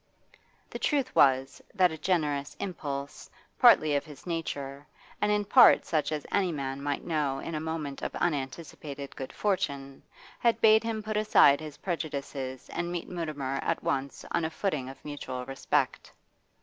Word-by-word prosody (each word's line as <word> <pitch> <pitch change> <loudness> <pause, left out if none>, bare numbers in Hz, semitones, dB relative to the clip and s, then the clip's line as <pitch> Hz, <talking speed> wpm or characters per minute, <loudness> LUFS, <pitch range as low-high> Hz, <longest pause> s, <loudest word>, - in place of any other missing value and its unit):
The - - -5
truth 280 -4 0
was, 135 0 +3
that 185 -3 +4
a - - -4
generous 150 -5 0
impulse, 145 -6 -5 0.3
partly 155 -1 +6
of 140 - +1
his 150 -2 -13
nature, 145 -5 -4 0.3
and 210 - +2
in 210 0 +1
part 245 +5 +7
such 155 -2 0
as 150 -1 -3
any 190 -3 +2
man 135 -2 -4
might 145 0 -2
know 150 -5 0
in 165 - -6
a 155 - -1
moment 155 -3 -4
of - - -4
unanticipated 145 -2 -4
good 130 - -6
fortune, 140 -9 -2 0.4
had 235 -1 +2
bade 220 0 +6
him 225 -1 -3
put 215 0 -2
aside 210 -9 +5
his 155 -2 -8
prejudices 140 -6 -4
and 175 0 -3
meet 175 -1 -4
Mutimer 150 -6 -3
at - - -1
once 140 0 -2
on 170 - +1
a 160 - 0
footing 165 -7 -2
of 135 - -10
mutual 130 -4 -5
respect. 135 +1 -1
150 Hz, 160 wpm, -29 LUFS, 140-175 Hz, 0.4 s, part